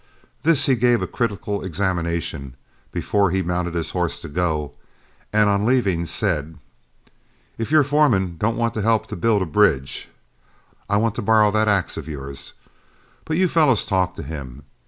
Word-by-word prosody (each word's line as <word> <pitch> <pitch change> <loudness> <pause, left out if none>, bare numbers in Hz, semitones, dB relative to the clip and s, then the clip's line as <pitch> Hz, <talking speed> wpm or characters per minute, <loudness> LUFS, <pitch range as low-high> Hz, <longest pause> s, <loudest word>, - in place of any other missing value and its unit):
This 155 +1 +3
he 135 - +3
gave 120 0 +2
a - - 0
critical 105 -3 -3
examination, 85 -7 -2 0.4
before 100 -2 +1
he 95 +2 0
mounted 90 0 -2
his 85 -2 -2
horse - - -2
to - - -7
go, 75 -2 -1 0.6
and 105 0 +3
on 100 0 +2
leaving 100 -8 +1
said, 80 -5 -1 1.0
"If 115 - -2
your 155 -1 +5
foreman 120 - +2
don't 115 +2 0
want 115 -1 0
to 110 - -2
help 110 0 +1
build 105 -3 +3
a - - -2
bridge, 80 -6 +1 0.8
I 100 - +3
want 110 0 +1
to - - -1
borrow 105 0 +4
that 110 +1 +1
axe 100 -4 +1
of 80 -2 -6
yours. 70 -3 -7 0.7
But 155 - -1
you 185 0 +3
fellows 155 - +3
talk 90 -2 0
to - - -7
him. 70 -3 -8
100 Hz, 165 wpm, -22 LUFS, 85-115 Hz, 1.0 s, your